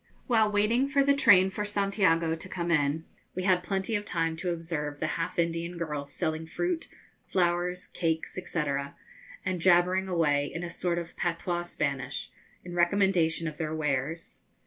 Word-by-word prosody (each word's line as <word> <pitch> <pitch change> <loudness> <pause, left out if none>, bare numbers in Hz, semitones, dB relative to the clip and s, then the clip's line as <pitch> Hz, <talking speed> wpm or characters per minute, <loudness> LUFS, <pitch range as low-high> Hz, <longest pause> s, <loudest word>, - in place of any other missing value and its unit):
While 220 -4 +3
waiting 220 +6 +2
for 280 0 +3
the 280 +1 +4
train 190 -8 +6
for 210 - -3
Santiago 195 -5 +2
to 165 +3 -9
come 175 -2 -2
in, 150 0 +1 0.3
we 185 - -2
had 185 -2 +3
plenty 190 +4 -2
of 205 - -1
time 165 -4 -1
to 180 +2 -2
observe 160 -4 -3
the - - -1
half 165 - -3
Indian 170 +1 -1
girls 150 -4 -4
selling 160 0 -2
fruit, 350 - -2 0.4
flowers, 180 0 0
cakes, 160 -2 -2
&c., 180 -3 -2 0.8
and 185 -2 -1
jabbering 185 +1 +4
away 150 -5 +1
in 165 - -5
a 170 - -4
sort 170 0 -1
of 170 -1 -5
patois 175 0 -1
Spanish, 140 -6 -3 0.3
in 175 - -7
recommendation 175 -2 +2
of 155 0 -6
their 155 -1 -2
wares. 150 +2 -2
175 Hz, 165 wpm, -29 LUFS, 160-190 Hz, 0.8 s, train